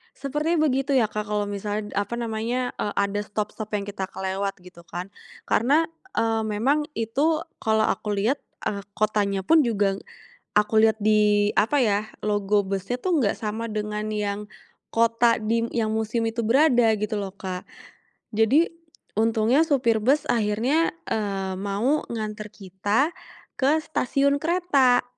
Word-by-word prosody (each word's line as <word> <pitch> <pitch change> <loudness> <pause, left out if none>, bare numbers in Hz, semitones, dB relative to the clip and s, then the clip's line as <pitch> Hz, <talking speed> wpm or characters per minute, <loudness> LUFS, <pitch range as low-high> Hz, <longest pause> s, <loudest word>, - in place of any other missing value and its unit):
Seperti 295 +5 -1
begitu 275 -2 +1
ya 225 -4 +3
Kak 210 -1 -3
kalau 210 0 0
misal 205 +1 -3
apa 205 +3 -1
namanya, 235 +2 -2
eee, 205 - -2
ada 200 +1 0
stop-stop 210 +1 -5
yang 200 - -1
kita 200 -1 -4
kelewat 195 +1 -3
gitu 180 -2 -14
kan. 180 +3 -6 0.4
Karena, 290 +8 +3 0.3
eee, 225 -1 +1
memang 265 +8 +1
itu 285 +8 +1 0.2
kalau 220 0 +2
aku 210 -1 -1
lihat, 230 +8 +1 0.3
eh 200 -1 -3
kotanya 205 -2 +1
pun 320 +6 +5
juga, 200 -4 +1 0.6
aku 210 +1 +3
lihat 220 0 +4
di 210 -1 +3
apa 230 +8 +3
ya, 205 -3 +2 0.2
logo 205 -1 +1
busnya 195 +5 -2
tuh 340 -1 +1
gak 205 - +1
sama 220 +1 -3
dengan 210 0 -3
yang, 205 -1 -2 0.5
kota 230 0 +3
dim 230 +1 0
yang 220 -2 0
musium 220 +1 -1
itu 225 +1 -2
berada 240 -2 +4
gitu 210 0 -2
loh 195 -1 -5
Kak. 185 -2 -6 0.7
Jadi, 245 +10 +4 0.5
untungnya 225 +6 +3
supir 245 -8 +2
bus 280 +5 +2
akhirnya, 235 +9 +1 0.2
eee, 195 -3 -2
mau 210 +10 0
nganter 215 -2 -5
kita, 205 - -1 0.4
ke 285 +4 +3
stasiun 280 -2 +1
kereta. 290 -8 +3
220 Hz, 145 wpm, -24 LUFS, 205-250 Hz, 0.7 s, pun